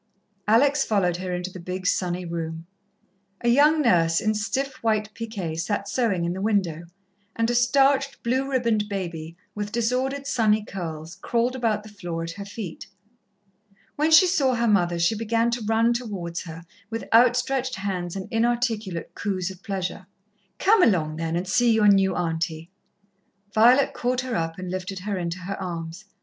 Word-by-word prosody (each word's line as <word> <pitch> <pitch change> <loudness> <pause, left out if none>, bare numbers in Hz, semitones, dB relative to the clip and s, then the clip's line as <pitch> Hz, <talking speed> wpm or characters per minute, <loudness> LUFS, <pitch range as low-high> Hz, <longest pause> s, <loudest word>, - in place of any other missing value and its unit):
Alex 275 +6 +4
followed 180 -5 +1
her 185 0 -4
into 180 +1 -3
the 185 - -9
big, 185 +2 -5
sunny 180 -1 0
room. 165 -1 -5 0.8
A 240 - +1
young 300 +5 +5
nurse, 165 -7 +3
in 215 0 +1
stiff 260 +6 -2
white 215 -1 0
piqué, 205 -8 -5
sat 200 +3 -2
sewing 200 -5 0
in 170 - -1
the 190 - -5
window, 190 -6 0 0.5
and 230 +1 +1
a - - 0
starched, 270 +3 +2
blue 260 +3 0
ribboned 230 -5 +1
baby, 170 -4 -5 0.2
with 205 0 -4
disordered, 255 +5 -1
sunny 220 -5 +2
curls, 165 -2 -6
crawled 235 +5 0
about 225 -4 0
the 215 - -11
floor 175 -5 -5
at 165 - -5
her 200 +4 -8
feet. 200 -4 -7 1.1
When 305 +2 +1
she 320 +4 +8
saw 285 -8 +2
her 235 0 +1
mother 175 -5 +2
she 170 +5 +2
began 230 +2 0
to 235 0 -2
run 225 +2 +3
towards 195 -8 -4
her, 165 0 -9 0.3
with 225 0 -5
outstretched 250 +2 +3
hands 185 -3 -3
and 190 -1 -5
inarticulate 225 -6 -1
coos 190 -2 -2
of 185 0 -13
pleasure. 190 -1 -4 0.5
"Come 420 +1 +4
along, 160 - +2
then, 165 0 -2
and 180 +2 -2
see 240 +5 +3
your 220 -2 +4
new 195 -2 +4
Auntie." 165 0 -3 0.8
Violet 245 +5 +5
caught 250 +1 -1
her 255 -2 -3
up 165 -1 -2
and 185 -1 -5
lifted 185 +1 -4
her 200 -1 -3
into 170 0 -3
her 195 +2 -5
arms. 170 +1 -6
205 Hz, 170 wpm, -24 LUFS, 175-235 Hz, 1.1 s, she